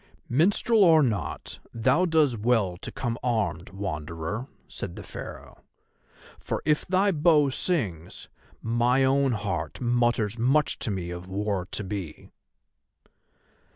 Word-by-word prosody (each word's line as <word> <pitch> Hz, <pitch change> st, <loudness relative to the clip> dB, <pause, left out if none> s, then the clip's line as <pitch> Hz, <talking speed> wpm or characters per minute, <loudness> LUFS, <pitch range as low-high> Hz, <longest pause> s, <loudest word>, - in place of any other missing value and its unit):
"Minstrel 200 Hz, -, +3 dB
or 160 Hz, -4 st, +6 dB
not, 105 Hz, -9 st, -3 dB, 0.2 s
thou 130 Hz, +10 st, +3 dB
does 155 Hz, -6 st, +3 dB
well 110 Hz, -5 st, +1 dB
to 90 Hz, -, -8 dB
come 120 Hz, -2 st, -3 dB
armed, 110 Hz, -8 st, -1 dB
Wanderer," 85 Hz, -, -4 dB, 0.2 s
said -, -, -7 dB
the -, -, -8 dB
Pharaoh; -, -, -9 dB, 0.8 s
"for -, -, -4 dB
if 150 Hz, 0 st, +1 dB
thy 190 Hz, +2 st, +3 dB
bow 150 Hz, -4 st, +4 dB
sings, 100 Hz, -, -2 dB, 0.4 s
my 120 Hz, +3 st, +2 dB
own 135 Hz, 0 st, +3 dB
heart 105 Hz, -5 st, -3 dB
mutters 120 Hz, -3 st, +1 dB
much 135 Hz, +5 st, +2 dB
to 120 Hz, -, -2 dB
me 90 Hz, -4 st, -3 dB
of 90 Hz, +1 st, -7 dB
war 100 Hz, -1 st, -2 dB
to 105 Hz, -, -2 dB
be." 95 Hz, -5 st, -6 dB
120 Hz, 125 wpm, -26 LUFS, 95-140 Hz, 0.8 s, or